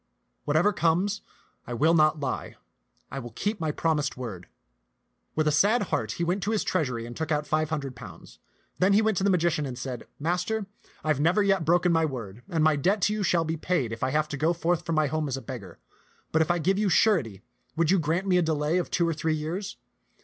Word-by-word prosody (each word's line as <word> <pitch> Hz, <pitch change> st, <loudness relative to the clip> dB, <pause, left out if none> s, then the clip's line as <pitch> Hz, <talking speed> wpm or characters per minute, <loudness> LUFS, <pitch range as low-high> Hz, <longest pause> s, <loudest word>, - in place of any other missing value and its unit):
Whatever 165 Hz, +8 st, +3 dB
comes, 180 Hz, +5 st, +1 dB, 0.5 s
I 120 Hz, -, -4 dB
will 155 Hz, +7 st, +3 dB
not 155 Hz, -1 st, +4 dB
lie; 135 Hz, -3 st, -4 dB, 0.6 s
I 135 Hz, -, -4 dB
will 120 Hz, -2 st, -7 dB
keep 205 Hz, -, -2 dB
my 160 Hz, -2 st, -1 dB
promised 150 Hz, -3 st, 0 dB
word." 105 Hz, -9 st, -7 dB, 0.9 s
With 155 Hz, 0 st, +1 dB
a -, -, +4 dB
sad 205 Hz, +9 st, +3 dB
heart -, -, 0 dB
he 170 Hz, -, -3 dB
went 180 Hz, +4 st, 0 dB
to 200 Hz, -, -1 dB
his 220 Hz, -2 st, +1 dB
treasury 125 Hz, -10 st, -1 dB
and 120 Hz, 0 st, -8 dB
took 160 Hz, -1 st, -3 dB
out 150 Hz, -1 st, +1 dB
five 155 Hz, 0 st, 0 dB
hundred 140 Hz, -5 st, -3 dB
pounds. 95 Hz, -9 st, -12 dB, 0.4 s
Then 190 Hz, +2 st, +4 dB
he 210 Hz, -, +5 dB
went 220 Hz, -3 st, +1 dB
to -, -, 0 dB
the 200 Hz, -, +3 dB
magi 175 Hz, -2 st, +3 dB
cian 150 Hz, -3 st, -2 dB
and 125 Hz, -2 st, -6 dB
said, 125 Hz, -1 st, -6 dB
" -, -, -46 dB
Master, 180 Hz, +7 st, -1 dB, 0.4 s
I 155 Hz, -, -2 dB
have 150 Hz, -3 st, +2 dB
never 175 Hz, +7 st, +3 dB
yet 195 Hz, -4 st, +2 dB
broken 175 Hz, +2 st, +3 dB
my 165 Hz, -1 st, +3 dB
word, 120 Hz, -7 st, -6 dB
and 160 Hz, -2 st, +1 dB
my 155 Hz, -1 st, +4 dB
debt 190 Hz, +9 st, +2 dB
to 210 Hz, -, +3 dB
you 215 Hz, -, -2 dB
shall 175 Hz, -4 st, +2 dB
be 160 Hz, +1 st, -2 dB
paid 155 Hz, -8 st, -1 dB
if 115 Hz, -, -6 dB
I 130 Hz, -, +1 dB
have 155 Hz, +2 st, +1 dB
to 145 Hz, -, -4 dB
go 160 Hz, +5 st, +2 dB
forth 175 Hz, 0 st, -1 dB
from 165 Hz, -, 0 dB
my 155 Hz, 0 st, +3 dB
home 155 Hz, +1 st, -1 dB
as 135 Hz, -1 st, -2 dB
a -, -, -4 dB
beggar; 100 Hz, -10 st, -8 dB, 0.5 s
but 160 Hz, -, +3 dB
if 160 Hz, -, +1 dB
I 175 Hz, -, +3 dB
give 190 Hz, +5 st, +1 dB
you 210 Hz, -2 st, +2 dB
surety, 145 Hz, -, +2 dB, 0.3 s
would 165 Hz, 0 st, +2 dB
you 195 Hz, -, +4 dB
grant 165 Hz, +5 st, 0 dB
me 185 Hz, -2 st, +3 dB
a -, -, +3 dB
delay 160 Hz, +1 st, +1 dB
of 175 Hz, -, -3 dB
two 170 Hz, -2 st, +1 dB
or 165 Hz, -, +1 dB
three 160 Hz, +1 st, -1 dB
years? 170 Hz, +7 st, -4 dB
160 Hz, 245 wpm, -27 LUFS, 145-180 Hz, 0.9 s, he